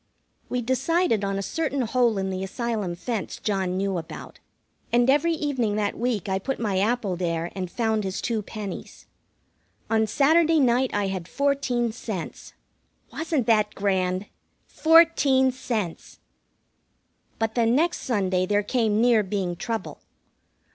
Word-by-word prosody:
We 250 Hz, -1 st, -1 dB
decided 260 Hz, -, +1 dB
on 195 Hz, 0 st, -1 dB
a 195 Hz, -, -2 dB
certain 285 Hz, +1 st, -2 dB
hole 235 Hz, -2 st, +2 dB
in 190 Hz, 0 st, -1 dB
the 185 Hz, 0 st, -3 dB
Asylum 210 Hz, -3 st, -3 dB
fence 220 Hz, +3 st, -4 dB
John 190 Hz, -3 st, -1 dB
knew 195 Hz, -2 st, -1 dB
about, 160 Hz, -, -10 dB, 0.5 s
and 240 Hz, +1 st, +3 dB
every 330 Hz, +4 st, +2 dB
evening 265 Hz, -9 st, -1 dB
that 210 Hz, -1 st, -1 dB
week 230 Hz, -5 st, -1 dB
I 190 Hz, 0 st, 0 dB
put 270 Hz, +7 st, -3 dB
my 205 Hz, -5 st, 0 dB
apple 210 Hz, -2 st, 0 dB
there 170 Hz, -1 st, -2 dB
and 185 Hz, -2 st, -4 dB
found 220 Hz, 0 st, 0 dB
his 190 Hz, -1 st, -3 dB
two 225 Hz, -2 st, -1 dB
pennies. 205 Hz, -2 st, -8 dB, 0.9 s
On 220 Hz, -1 st, +3 dB
Saturday 320 Hz, +6 st, +4 dB
night 255 Hz, -1 st, +3 dB
I 205 Hz, -1 st, 0 dB
had 190 Hz, -3 st, -4 dB
fourteen 270 Hz, -4 st, 0 dB
cents. 215 Hz, -6 st, -7 dB, 0.6 s
Wasn't 320 Hz, -6 st, -1 dB
that 210 Hz, -2 st, +2 dB
grand? 190 Hz, -1 st, 0 dB, 0.4 s
Fourteen 315 Hz, -5 st, +4 dB
cents! 220 Hz, -9 st, -4 dB, 1.2 s
But 225 Hz, -1 st, -1 dB
the 235 Hz, -2 st, +2 dB
next 310 Hz, +9 st, +2 dB
Sunday 190 Hz, -6 st, 0 dB
there 205 Hz, +1 st, +2 dB
came 220 Hz, -1 st, +1 dB
near 235 Hz, -2 st, +5 dB
being 190 Hz, -3 st, -2 dB
trouble. 225 Hz, +2 st, -4 dB
220 Hz, 140 wpm, -25 LUFS, 195-255 Hz, 1.2 s, near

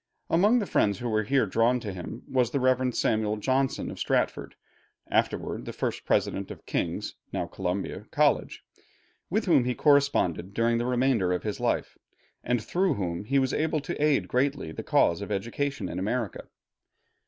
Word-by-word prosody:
Among 205 Hz, +8 st, +5 dB
the 220 Hz, -, 0 dB
friends 100 Hz, -, +2 dB
who 120 Hz, -, -4 dB
were 110 Hz, -1 st, +2 dB
here 135 Hz, +3 st, +2 dB
drawn 115 Hz, +5 st, +2 dB
to 105 Hz, -4 st, -5 dB
him 90 Hz, -2 st, -7 dB
was 125 Hz, -3 st, +1 dB
the 140 Hz, -, -1 dB
Rev. 130 Hz, -1 st, +2 dB
Samuel 110 Hz, -1 st, +1 dB
Johnson 130 Hz, +4 st, 0 dB
of -, -, -9 dB
Stratford, -, -, -1 dB, 0.6 s
afterward -, -, 0 dB
the -, -, -6 dB
first -, -, -3 dB
President 100 Hz, -, 0 dB
of -, -, -10 dB
King's -, -, -2 dB, 0.2 s
(now -, -, -2 dB
Columbia) 95 Hz, +1 st, -4 dB
College, -, -, +1 dB, 0.7 s
with 215 Hz, +5 st, 0 dB
whom 155 Hz, -9 st, +4 dB
he 125 Hz, 0 st, -1 dB
corresponded 140 Hz, -, +2 dB
during 115 Hz, 0 st, +2 dB
the 120 Hz, -, -1 dB
remainder 125 Hz, -7 st, +2 dB
of 90 Hz, -, -1 dB
his 105 Hz, -2 st, -3 dB
life, -, -, -1 dB, 0.4 s
and 120 Hz, -3 st, 0 dB
through 180 Hz, -, +1 dB
whom 90 Hz, -2 st, -3 dB
he 140 Hz, +5 st, +1 dB
was 130 Hz, -1 st, +2 dB
able 155 Hz, 0 st, +1 dB
to 145 Hz, -, -3 dB
aid 150 Hz, -2 st, +2 dB
greatly 135 Hz, -, 0 dB
the -, -, -6 dB
cause 85 Hz, +4 st, +2 dB
of 100 Hz, -, -6 dB
education 125 Hz, +8 st, -2 dB
in -, -, -4 dB
America. 105 Hz, +1 st, -2 dB
125 Hz, 175 wpm, -27 LUFS, 100-140 Hz, 0.7 s, Among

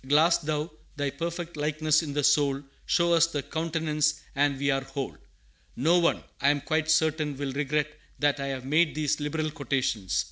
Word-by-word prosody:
Glass 155 Hz, +5 st, +4 dB
Thou 155 Hz, 0 st, -2 dB, 0.2 s
Thy 145 Hz, -1 st, -1 dB
perfect 170 Hz, +1 st, -5 dB
likeness 155 Hz, +1 st, +1 dB
in 150 Hz, -3 st, -5 dB
the 145 Hz, 0 st, 0 dB
soul, 140 Hz, -1 st, +3 dB, 0.2 s
Show 170 Hz, -1 st, +3 dB
us 165 Hz, 0 st, +5 dB
Thy 145 Hz, -4 st, -3 dB
countenance, 155 Hz, -2 st, -1 dB, 0.2 s
and 140 Hz, 0 st, +2 dB
we 140 Hz, +1 st, +1 dB
are 135 Hz, 0 st, +1 dB
whole!" 135 Hz, 0 st, -5 dB, 0.6 s
No 165 Hz, +8 st, +3 dB
one, 170 Hz, -, +1 dB, 0.2 s
I 140 Hz, -, +4 dB
am 145 Hz, 0 st, +1 dB
quite 155 Hz, +1 st, -1 dB
certain, 155 Hz, -2 st, +2 dB
will 140 Hz, -1 st, -3 dB
regret 150 Hz, +1 st, -1 dB, 0.2 s
that 145 Hz, -1 st, +1 dB
I 140 Hz, -, -3 dB
have 130 Hz, -2 st, -4 dB
made 155 Hz, +3 st, +2 dB
these 155 Hz, 0 st, 0 dB
liberal 155 Hz, +1 st, -2 dB
quotations. 130 Hz, -, -1 dB
150 Hz, 180 wpm, -27 LUFS, 140-160 Hz, 0.6 s, us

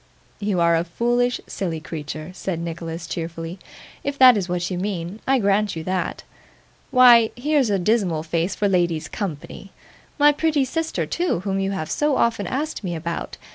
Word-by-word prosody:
'You 200 Hz, -3 st, 0 dB
are 170 Hz, 0 st, +4 dB
a 165 Hz, -, +1 dB
foolish, 240 Hz, +7 st, 0 dB
silly 170 Hz, -5 st, -3 dB
creature,' 155 Hz, +1 st, -6 dB
said 185 Hz, -2 st, -4 dB
Nicholas 165 Hz, 0 st, -5 dB
cheerfully. 165 Hz, +1 st, -5 dB, 0.4 s
'If 280 Hz, 0 st, -3 dB
that 255 Hz, -2 st, +8 dB
is 190 Hz, -3 st, -2 dB
what 180 Hz, +1 st, -2 dB
you 180 Hz, -, -2 dB
mean, 190 Hz, 0 st, -4 dB
I 270 Hz, 0 st, +4 dB
grant 205 Hz, -2 st, +1 dB
you 160 Hz, -, -5 dB
that. 185 Hz, +1 st, -2 dB, 0.7 s
Why, 240 Hz, -3 st, +7 dB
here's 280 Hz, -1 st, +1 dB
a 200 Hz, -, +2 dB
dismal 185 Hz, -5 st, +1 dB
face 165 Hz, +3 st, -1 dB
for 205 Hz, -, +1 dB
ladies' 175 Hz, -4 st, +1 dB
company! 195 Hz, +1 st, -6 dB, 0.5 s
my 295 Hz, 0 st, +6 dB
pretty 295 Hz, -2 st, +1 dB
sister 320 Hz, +5 st, -2 dB
too, 345 Hz, -, -1 dB
whom 195 Hz, 0 st, -1 dB
you 195 Hz, 0 st, 0 dB
have 155 Hz, -5 st, -4 dB
so 295 Hz, -2 st, +1 dB
often 225 Hz, -5 st, +1 dB
asked 290 Hz, -, -3 dB
me 175 Hz, -3 st, -3 dB
about. 170 Hz, +1 st, -5 dB
195 Hz, 175 wpm, -22 LUFS, 170-240 Hz, 0.7 s, that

